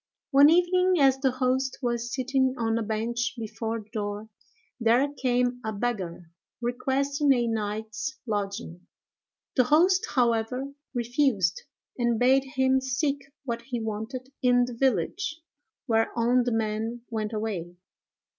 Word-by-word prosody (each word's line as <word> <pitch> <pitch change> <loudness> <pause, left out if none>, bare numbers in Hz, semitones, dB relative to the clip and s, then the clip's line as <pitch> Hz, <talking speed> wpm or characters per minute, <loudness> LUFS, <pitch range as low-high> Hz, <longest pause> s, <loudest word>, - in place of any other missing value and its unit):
One 280 +1 +8
evening, 360 +2 +4
as 270 -1 +4
the 265 -1 +2
host 255 +1 0
was 240 0 -1
sitting 260 0 +1
on 225 -1 0
a - - -2
bench 230 +4 -2
before 225 0 -4
the 210 - -20
door, 205 0 -4 0.5
there 235 +4 +4
came 250 -2 0
a 220 - -2
beggar, 195 -7 -3 0.3
requesting 275 +4 0
a 240 -2 +1
night's 220 +3 -3
lodging. 200 -5 -4 0.7
The 255 - +4
host, 355 +7 +4
however, 250 +2 +1 0.2
refused, 235 - +1 0.4
and 235 -1 +2
bade 260 +3 +4
him 265 0 +3
seek 275 +2 -1 0.2
what 235 -2 -3
he 240 0 -4
wanted 225 +5 -5
in 245 -1 +4
the 245 - -7
village; 265 - 0 0.5
whereon 235 +2 +2
the 245 - 0
man 225 +1 -2
went 215 -1 -2
away. 205 -6 -4
240 Hz, 130 wpm, -27 LUFS, 220-265 Hz, 0.7 s, One